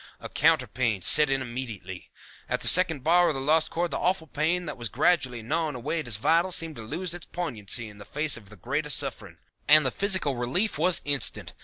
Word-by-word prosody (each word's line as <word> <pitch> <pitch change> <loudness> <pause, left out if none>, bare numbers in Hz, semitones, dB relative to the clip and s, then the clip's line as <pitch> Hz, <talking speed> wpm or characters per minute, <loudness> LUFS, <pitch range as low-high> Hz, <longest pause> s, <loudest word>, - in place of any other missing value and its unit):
A - - -9
counter - - +2
pain 115 -7 -2
set 150 -1 +6
in 135 -1 0
immediately. 115 -7 -8 0.4
At - - -2
the - - -2
second 165 -7 +6
bar 175 +3 +4
of 150 - -2
the - - -3
Lost 155 +4 +1
Chord 175 +1 -2
the - - -3
awful 180 -2 -1
pain 160 +4 -1
that - - -5
was 120 -3 -6
gradually 130 -5 0
gnawing 155 +3 -2
away 145 +7 -3
at 155 - -5
his 115 -4 0
vitals 170 - +1
seemed 160 -4 -4
to - - -8
lose 165 +10 -4
its 175 -2 -9
poignancy 120 - -3
in 105 -1 -14
the - - -10
face 150 +4 +1
of 105 -4 -7
the 105 - -14
greater 145 - -4
suffering, 145 - -4 0.3
and 150 -4 +6
physical 185 -9 +1
relief 135 - -1
was 180 +2 +2
instant. 140 -4 -2
150 Hz, 215 wpm, -26 LUFS, 120-165 Hz, 0.4 s, set